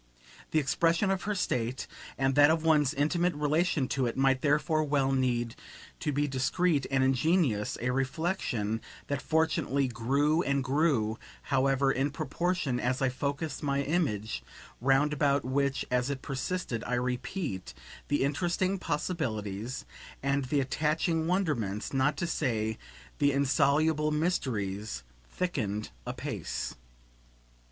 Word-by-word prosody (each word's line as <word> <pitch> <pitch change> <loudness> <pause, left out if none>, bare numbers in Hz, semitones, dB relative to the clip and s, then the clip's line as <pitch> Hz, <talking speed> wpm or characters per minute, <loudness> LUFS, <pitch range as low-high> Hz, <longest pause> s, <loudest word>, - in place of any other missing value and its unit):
The - - 0
expression 165 +6 +2
of 190 -1 -1
her 210 0 0
state 125 -8 -1 0.3
and 135 0 +2
that 145 +2 +7
of 160 0 +2
one's 150 -4 +4
intimate 170 +4 +1
relation 150 -1 +1
to 130 -3 +1
it 115 - -3
might 135 -1 +3
therefore 155 +2 +2
well 140 -2 +1
need 120 -3 +1 0.5
to 150 - -1
be 145 +1 +1
discreet 140 +3 +1
and 135 -1 +2
ingenious; 135 - +2
a 125 +1 0
reflexion 130 - -1 0.3
that 145 -1 -1
fortunately 155 -4 +1
grew 140 +7 +1
and 140 -4 0
grew, 130 -6 +1 0.2
however, 135 0 +2
in 135 +2 +1
proportion 155 -2 -1
as 125 +1 0
I 135 - +2
focussed 140 +3 -3
my 140 -1 0
image 110 - -1 0.4
roundabout 140 +1 +2
which, 140 +1 0
as 125 +1 +1
it 140 -2 -4
persisted, 135 -3 -3
I 125 - 0
repeat, 125 - -3 0.3
the 145 -1 +1
interesting 175 +6 0
possibilities 115 - -3 0.4
and 140 0 +1
the 140 +2 +1
attaching 160 +4 0
wonderments, 145 - -1
not 135 +2 +2
to 175 - -1
say 110 -9 -1 0.4
the 145 0 +4
insoluble 145 +3 +2
mysteries, 110 - -1 0.3
thickened 110 - -2 0.2
apace. - - -4
140 Hz, 130 wpm, -30 LUFS, 125-155 Hz, 0.5 s, that